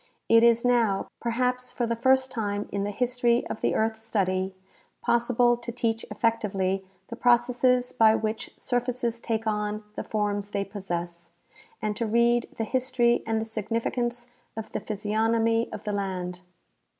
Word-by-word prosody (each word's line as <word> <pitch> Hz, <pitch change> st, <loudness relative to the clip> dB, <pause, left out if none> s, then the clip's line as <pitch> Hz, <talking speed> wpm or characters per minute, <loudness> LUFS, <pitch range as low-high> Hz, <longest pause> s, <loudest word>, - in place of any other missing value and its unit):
It 230 Hz, 0 st, +6 dB
is 235 Hz, 0 st, +5 dB
now, 230 Hz, -6 st, +2 dB
per 235 Hz, -, -2 dB
haps 250 Hz, +1 st, 0 dB
for 240 Hz, -, -1 dB
the 230 Hz, 0 st, -1 dB
first 260 Hz, +2 st, +3 dB
time 205 Hz, -3 st, -2 dB
in 200 Hz, 0 st, -1 dB
the -, -, -2 dB
history 245 Hz, +2 st, +1 dB
of -, -, -5 dB
the -, -, +1 dB
earth 220 Hz, 0 st, +1 dB
study, 190 Hz, -4 st, -1 dB, 0.4 s
possible 240 Hz, 0 st, +3 dB
to 235 Hz, 0 st, -6 dB
teach 230 Hz, -1 st, -1 dB
effectively 205 Hz, -4 st, 0 dB, 0.3 s
the 235 Hz, -, -5 dB
processes 250 Hz, +1 st, +3 dB
by 220 Hz, -2 st, +5 dB
which 220 Hz, 0 st, -2 dB
surfaces 245 Hz, -1 st, -1 dB
take 225 Hz, -1 st, -2 dB
on 210 Hz, 0 st, -1 dB
the -, -, -4 dB
forms 205 Hz, -1 st, -1 dB
they 200 Hz, -1 st, -2 dB
possess, 175 Hz, -4 st, -5 dB, 0.5 s
and 210 Hz, -1 st, 0 dB
to 230 Hz, -, -1 dB
read 235 Hz, +2 st, +3 dB
the 225 Hz, -, 0 dB
history 240 Hz, 0 st, +2 dB
and 225 Hz, 0 st, +1 dB
the 220 Hz, -, -2 dB
significance 230 Hz, +2 st, -2 dB, 0.3 s
of 220 Hz, -1 st, -6 dB
the -, -, -2 dB
physiognomy 225 Hz, +2 st, 0 dB
of -, -, -7 dB
the 210 Hz, -, -2 dB
land. 185 Hz, -3 st, -3 dB
225 Hz, 160 wpm, -27 LUFS, 210-240 Hz, 0.5 s, It